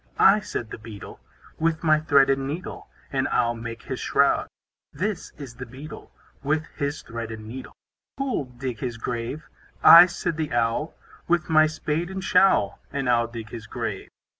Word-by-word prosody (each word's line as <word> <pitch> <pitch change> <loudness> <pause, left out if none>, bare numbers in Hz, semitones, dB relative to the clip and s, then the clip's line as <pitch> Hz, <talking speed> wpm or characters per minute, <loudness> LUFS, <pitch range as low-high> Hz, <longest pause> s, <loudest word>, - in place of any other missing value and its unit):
I, 200 +2 +6
said 120 - -5
the - - -7
Beetle, 110 -2 -10 0.4
With 165 0 0
my 155 -1 +4
thread 140 -3 +4
and 135 0 -1
needle, 165 +6 -6 0.3
And - - +1
I'll 120 0 +1
make 115 0 -7
his - - -5
shroud. - - +2 0.4
This 205 0 -3
is 140 -5 -8
the 125 - -6
Beetle, 135 +6 -10 0.3
With 155 +3 0
his 145 0 -3
thread 115 -1 -6
and 110 -1 -8
needle. 130 +3 -9 0.4
Who'll 270 - -1
dig 125 -2 -6
his 120 -3 -4
grave? 120 +5 -4 0.4
I, 170 +2 +11
said 175 -2 -3
the 155 -4 -3
Owl, 120 +6 0 0.3
With 170 -1 +1
my 155 0 +6
spade 155 +2 -2
and 190 0 -5
showl, 185 - +3
And 140 -2 -2
I'll 120 -1 +3
dig 115 -1 -8
his 110 -2 -8
grave. - - -5
140 Hz, 170 wpm, -25 LUFS, 115-160 Hz, 0.4 s, I